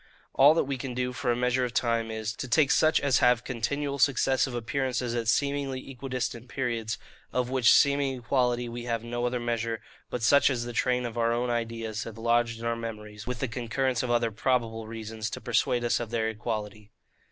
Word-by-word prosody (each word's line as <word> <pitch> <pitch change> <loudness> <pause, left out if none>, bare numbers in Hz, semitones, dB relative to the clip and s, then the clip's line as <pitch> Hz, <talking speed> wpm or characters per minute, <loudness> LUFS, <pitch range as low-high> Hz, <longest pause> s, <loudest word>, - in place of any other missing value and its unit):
All 145 +3 +7
that - - +3
we 135 -1 -3
can 125 -1 -5
do 125 0 -1
for 120 0 -1
a - - +1
measure 125 +1 +1
of 125 -1 -3
time 115 -1 +1
is, 110 0 -3
to - - -4
take 140 +3 +3
such 155 0 +4
as 140 -3 +2
have 125 -1 +4
continual 140 +4 -2
successive 130 -1 +2
appearances 125 -1 -1
at 115 -2 -2
seemingly 140 0 0
equidistant 125 -2 -4
periods; 115 -3 -2 0.3
of 125 0 -1
which 130 -3 +5
seeming 140 -2 +4
equality 125 0 0
we 120 0 -6
have 115 -2 -2
no 120 +1 -2
other 125 0 -1
measure, 115 -1 -2 0.3
but 125 - -4
such 140 +5 +5
as 120 -3 -1
the 120 - -6
train 125 +1 +1
of 120 0 -4
our 115 0 +2
own 120 +1 0
ideas 115 -2 -3
have 115 -1 -8
lodged 115 0 +1
in 115 - -6
our 115 0 0
memories, 105 -2 -7
with 125 -2 -4
the 135 - +1
concurrence 125 +2 -1
of 125 - -3
other 120 -1 +2
PROBABLE 115 -1 -1
reasons, 110 -1 -5
to - - -6
persuade 120 0 +1
us 120 - +1
of 120 -2 -4
their 110 -1 0
equality. 105 -2 -5
120 Hz, 205 wpm, -28 LUFS, 115-130 Hz, 0.3 s, All